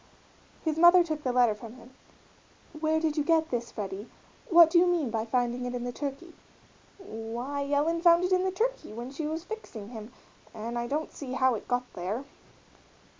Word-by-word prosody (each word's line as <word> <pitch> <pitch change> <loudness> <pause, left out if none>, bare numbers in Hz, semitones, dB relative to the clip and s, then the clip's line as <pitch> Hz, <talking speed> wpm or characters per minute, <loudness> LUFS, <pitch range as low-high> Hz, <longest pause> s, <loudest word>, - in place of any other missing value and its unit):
His 315 0 0
mother 345 +1 +8
took 310 -3 -4
the 255 - -1
letter 245 -3 +4
from 220 +2 -10
him. 250 0 -15 0.9
"Where 315 0 +1
did 315 -1 -1
you 300 - +2
get 320 0 +2
this, 235 -1 -2
Freddie 200 0 -6 0.4
what 335 -2 +8
do 345 - +6
you 360 - +4
mean 330 -9 +1
by 220 -1 -1
finding 245 +1 0
it 245 - -4
in 245 - -3
the 245 - -3
turkey?" 290 +6 -6 0.6
"Why, 260 - -5
Ellen 320 +4 +1
found 340 0 +6
it 365 - 0
in 365 0 +3
the 380 - +1
turkey 455 - -2
when 240 +3 -7
she 300 +2 -4
was 320 +2 -4
fixing 350 - -8
him, 225 -1 -9 0.4
and 230 +2 -4
I 240 - -3
don't 300 +4 -3
see 260 -3 -7
how 260 0 +3
it 215 - -6
got 245 0 0
there." 200 +10 -4
275 Hz, 195 wpm, -28 LUFS, 235-330 Hz, 0.9 s, mother